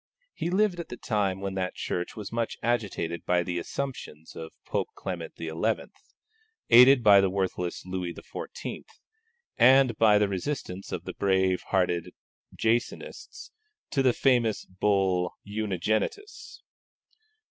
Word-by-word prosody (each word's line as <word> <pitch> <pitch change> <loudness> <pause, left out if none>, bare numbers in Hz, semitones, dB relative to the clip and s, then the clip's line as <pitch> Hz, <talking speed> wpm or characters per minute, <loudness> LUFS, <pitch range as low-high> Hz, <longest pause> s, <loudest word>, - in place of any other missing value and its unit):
He 170 - -3
lived 190 -1 +1
at 170 - -6
the 120 - -7
time 100 -5 -1
when 100 -1 -3
that 95 -1 -3
Church 90 0 -3
was 105 -3 -7
much 115 0 -2
agitated 100 -8 -1
by 90 0 +2
the 85 0 -3
assumptions 85 - -6
of 80 0 -7
Pope - - -1
Clement - - -5
XI., 80 -1 -5 1.2
aided 125 +1 +8
by 100 -2 +8
the 95 - +2
worthless 90 -2 -2
Louis 90 -1 -3
XIV., - - -7 0.8
and 130 0 +6
by 105 -2 +6
the 105 0 +3
resistance 95 -1 -4
of - - -4
the - - -6
brave 95 -2 +1
hearted 90 -3 0 0.4
Jansenists 115 +2 -2 0.4
to 140 - +1
the 130 -1 +4
famous 120 -4 +1
Bull 95 -2 0
Unigenitus. 110 - -3
100 Hz, 130 wpm, -27 LUFS, 90-120 Hz, 1.2 s, aided